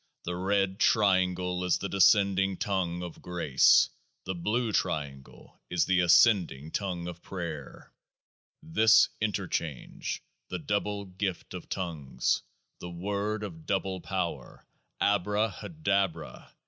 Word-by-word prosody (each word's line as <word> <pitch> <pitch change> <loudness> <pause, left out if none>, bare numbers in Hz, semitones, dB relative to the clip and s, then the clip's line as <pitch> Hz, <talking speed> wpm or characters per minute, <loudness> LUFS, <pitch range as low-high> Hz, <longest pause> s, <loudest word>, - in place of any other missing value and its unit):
The 90 - -3
Red 95 +1 0
Triangle 90 -3 +2
is 90 -2 +2
the 100 - -4
descending 95 -1 +3
tongue 90 -3 -1
of 85 -2 -8
grace; 85 -7 +4 0.3
the 95 - -2
Blue 110 +7 -1
Triangle 70 -9 -4
is 90 -1 +1
the 95 -1 +2
ascending 85 - +4
tongue 90 -4 -3
of 85 -1 -8
prayer 85 -7 -7 0.7
This 110 +6 +5
Interchange, 90 - -3 0.2
the 90 - -4
Double 100 +2 -2
Gift 95 0 -4
of - - -8
Tongues, 80 -7 -1 0.4
the 90 - -7
Word 100 +4 -3
of 80 -6 -8
Double 95 -1 -1
Power— 85 -11 -4 0.4
ABRAHA 105 +1 0
DABRA 95 - -1
95 Hz, 115 wpm, -29 LUFS, 85-100 Hz, 0.7 s, This